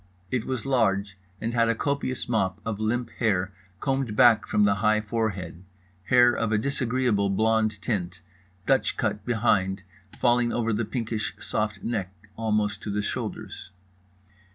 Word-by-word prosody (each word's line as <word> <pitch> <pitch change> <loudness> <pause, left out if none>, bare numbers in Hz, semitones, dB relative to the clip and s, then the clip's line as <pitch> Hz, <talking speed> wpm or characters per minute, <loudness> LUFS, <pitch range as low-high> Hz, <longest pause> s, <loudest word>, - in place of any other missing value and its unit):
It 125 -3 -1
was 130 -1 -3
large, 100 -7 +1 0.2
and 115 +1 -3
had 115 -1 +3
a 115 - +2
copious 140 0 -2
mop 100 -4 0
of 110 -2 -3
limp 115 +2 -1
hair 95 -4 +1 0.3
combed 135 -4 -1
back 120 -2 +5
from 105 - +2
the 100 - +4
high 110 0 +4
forehead—hair 95 +1 0
of 115 -1 -1
a 110 - +3
disagreeable 125 -4 0
blond 110 +1 +1
tint, 90 -5 -2 0.5
dutch 135 +2 +2
cut 105 -3 -1
behind, 95 -5 +1 0.3
falling 120 -1 +3
over 115 -1 0
the 110 +2 0
pinkish 110 -1 -3
soft 105 -2 -2
neck 95 -6 -2 0.2
almost 105 -2 0
to - - -6
the 105 +1 -1
shoulders. 90 - -5
110 Hz, 145 wpm, -26 LUFS, 100-120 Hz, 0.5 s, back